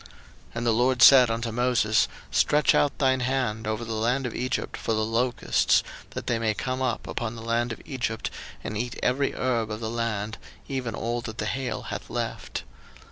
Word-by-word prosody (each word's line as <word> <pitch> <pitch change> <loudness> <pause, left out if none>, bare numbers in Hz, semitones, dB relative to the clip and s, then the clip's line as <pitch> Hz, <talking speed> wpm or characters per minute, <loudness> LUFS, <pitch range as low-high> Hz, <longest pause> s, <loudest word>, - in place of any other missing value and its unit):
02:010:012 - - -17 0.5
And 115 0 -2
the 115 - +4
LORD 125 +2 +2
said 125 -1 +9
unto 115 0 -2
Moses, 115 -3 +2 0.2
Stretch 150 +1 +4
out 145 - +2
thine 130 -2 +3
hand 125 -4 -1
over 110 +2 -2
the 115 - -4
land 120 +5 0
of 125 - -3
Egypt 125 +1 -2
for 115 - -2
the 110 0 +1
locusts, 120 +2 +2 0.3
that - - -4
they 120 -2 0
may 110 -2 0
come 130 +3 -2
up 130 - -1
upon 115 -1 -3
the 115 - -8
land 115 +1 0
of 110 - -7
Egypt, 125 -5 -3 0.3
and 110 - -4
eat 120 +2 -3
every 135 +3 +1
herb 120 -4 0
of 105 0 -4
the 110 -1 -3
land, 110 -2 -2 0.3
even 125 -5 -3
all 120 +1 -2
that 115 -1 -7
the 110 - -2
hail 130 +3 -2
hath - - -6
left. - - -4
120 Hz, 195 wpm, -26 LUFS, 110-125 Hz, 0.5 s, said